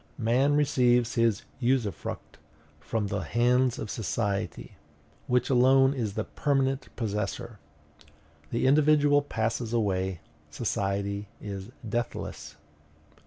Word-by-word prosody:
Man 130 +5 +2
receives 125 -5 +3
his 115 -3 +2 0.2
usufruct 125 -5 -2 0.4
from 110 -2 -2
the 100 0 -2
hands 120 +7 +2
of 105 - -5
society, 105 -2 -2 0.6
which 125 +1 +1
alone 135 +2 +5
is 110 -7 -3
the 110 - -1
permanent 135 0 0
possessor. 110 +1 -3 0.9
The 115 - -1
individual 145 +1 +5
passes 115 -3 -2
away, 95 -5 0 0.3
society 100 +1 -2
is 100 0 -6 0.2
deathless. 120 +3 -4
120 Hz, 100 wpm, -28 LUFS, 105-130 Hz, 0.9 s, alone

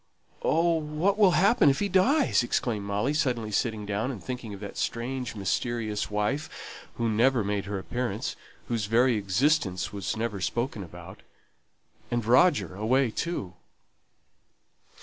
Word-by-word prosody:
"Oh, 165 0 +2
what 160 +7 0
will 195 -4 +6
happen 195 -5 +5
if 135 - +2
he 205 - 0
dies!" 245 - +3
exclaimed 120 -3 -1
Molly, 105 +8 0
suddenly 120 -7 0
sitting 105 0 -1
down, 105 +4 -1
and 120 -8 -6
thinking 125 -4 -5
of 100 - -8
that 100 0 -8
strange, 125 0 -3
mysterious 110 +2 -2
wife 105 +9 -1 0.5
who 115 - -1
never 115 +2 +3
made 100 -1 -2
her 100 0 -3
appearance, 115 +2 -3 0.3
whose 115 -4 -1
very 120 +3 +3
existence 105 - +1
was 100 +2 -3
never 110 -4 -3
spoken 120 +1 -2
about 85 +1 -11 0.9
and 120 -2 -1
Roger 115 - +4
away 115 +5 +1
too! 110 - -3
115 Hz, 140 wpm, -27 LUFS, 105-135 Hz, 0.9 s, will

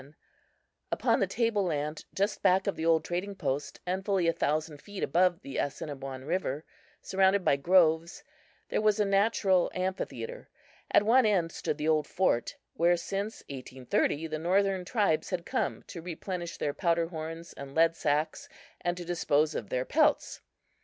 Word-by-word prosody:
Upon - - +2
the - - +2
table 230 -4 +1
land 150 -3 -2
just 200 +2 0
back 190 0 +4
of 200 - -1
the 160 - -2
old 160 -2 +3
trading 185 +3 -3
post 140 -4 -3
and 185 +2 -2
fully 195 -4 +1
a 165 - +3
thousand 155 -1 -1
feet 205 -2 -7
above 175 +3 +2
the 135 - -6
Assiniboine 135 -2 -4
river, 160 -3 -2 0.4
surrounded 190 0 +2
by - - +5
groves, 165 +1 +3 0.5
there - - 0
was 215 0 +3
a 210 - +3
natural 195 -2 +3
amphitheatre. 190 - -4 0.4
At - - +5
one 235 +2 +5
end 180 -6 +2
stood 150 - -3
the 150 0 -2
old 155 -2 +2
fort 175 -10 0 0.2
where 175 +1 +3
since 200 +5 -4
1830 135 +3 -1
the 155 -1 -4
northern 190 +2 +1
tribes 200 -8 +1
had 180 -2 -3
come - - -2
to 170 - -9
replenish 175 0 -5
their 145 - -1
powder 170 -1 +1
horns 165 0 -7
and 140 0 -9
lead 165 +1 +4
sacks 155 0 -1 0.3
and 175 0 0
to 175 - -6
dispose 155 -3 +1
of 105 - -5
their 125 0 -1
pelts. 310 +1 +2
170 Hz, 165 wpm, -29 LUFS, 155-195 Hz, 0.5 s, by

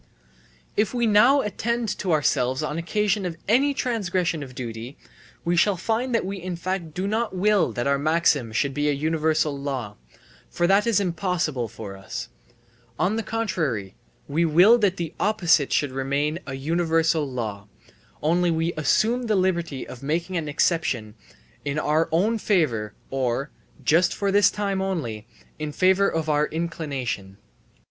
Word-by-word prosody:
If 210 +3 +1
now 240 +4 +5
we - - -5
attend 230 +1 -1
to 185 - -1
ourselves 130 -3 +1
on 150 +1 -2
occasion 210 +4 0
of 175 -2 -4
any 265 +7 +4
transgression 185 - -1
of 130 -3 -9
duty, 120 +2 -6 0.5
we 175 +1 +2
shall 190 +2 +3
find 230 +6 -1
that 230 - +1
we 195 0 -5
in 180 0 -4
fact 175 -2 -4
do 185 +2 -2
not 220 0 -1
will 200 - +3
that 120 +2 -2
our 140 0 +2
maxim 150 -5 +2
should 135 +5 0
be 145 +2 0
a - - +2
universal 155 0 0
law, 135 -7 -4 0.5
for 175 - 0
that 195 +5 +3
is 220 -4 +3
impossible 175 - -1
for 100 -2 -8
us; 95 -9 -7 0.7
on 195 +4 +1
the 225 - 0
contrary, 165 - -2 0.3
we 155 +4 +1
will 180 +9 +6
that 195 -3 +1
the 170 -2 -4
opposite 175 -9 +2
should 145 -3 +1
remain 140 +4 -1
a 135 - -4
universal 160 0 +1
law, 105 -5 -4 0.6
only 175 +3 +2
we 165 +1 0
assume 230 - +1
the 215 - +2
liberty 170 -7 -1
of 125 - -10
making 165 +6 -2
an 160 -3 -2
exception 145 -8 0 0.5
in 145 +1 -2
our 155 +1 +1
own 210 +8 +2
favour 125 - 0 0.2
or 135 +1 -1 0.3
(just 170 +3 +3
for 200 -1 0
this 205 0 +5
time 200 -2 -2
only) 120 - -3 0.3
in 155 -1 -3
favour 190 +5 +3
of 160 -1 -2
our 150 0 +2
inclination. 140 - -4
165 Hz, 160 wpm, -24 LUFS, 140-195 Hz, 0.7 s, will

